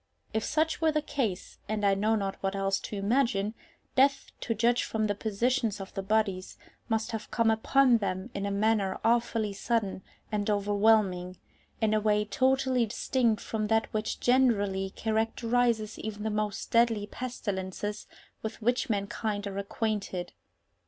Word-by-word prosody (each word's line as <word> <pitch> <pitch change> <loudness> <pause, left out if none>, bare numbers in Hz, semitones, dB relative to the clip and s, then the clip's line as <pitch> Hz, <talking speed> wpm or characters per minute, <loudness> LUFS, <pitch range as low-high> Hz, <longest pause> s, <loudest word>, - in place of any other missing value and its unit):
If 220 0 0
such 315 +4 0
were 320 -1 +4
the 305 -1 0
case 225 -11 -3
(and 215 -1 0
I 200 - +5
know 215 +3 +2
not 195 -2 -2
what 195 0 -1
else 195 0 0
to - - -6
imagine), 210 -1 +1 0.4
death, 275 +1 +3
to 230 - -1
judge 235 +3 +3
from 220 -1 -1
the 205 - +1
positions 225 +2 0
of 195 - -8
the 195 - -3
bodies, 195 -2 0 0.3
must 225 +1 0
have 225 -2 -5
come 225 0 +2
upon 245 +2 +4
them 195 +2 -3
in 200 0 -2
a - - -1
manner 200 -1 +1
awfully 230 -2 +1
sudden 205 -2 -1 0.3
and 210 0 -1
overwhelming, 205 -3 +2 0.4
in 220 -1 +2
a 215 - +3
way 210 0 +2
totally 260 +1 +2
distinct 235 0 0
from 215 -1 -2
that 225 +1 +1
which 215 0 -2
generally 205 -7 +2
characterizes 225 +1 0
even 210 -1 -5
the 220 - -1
most 210 -1 -2
deadly 230 -3 +3
pestilences 205 -4 -4 0.3
with 220 0 -5
which 245 +4 0
mankind 205 0 -2
are 200 0 -4
acquainted. 200 -3 -3
215 Hz, 155 wpm, -29 LUFS, 200-235 Hz, 0.4 s, I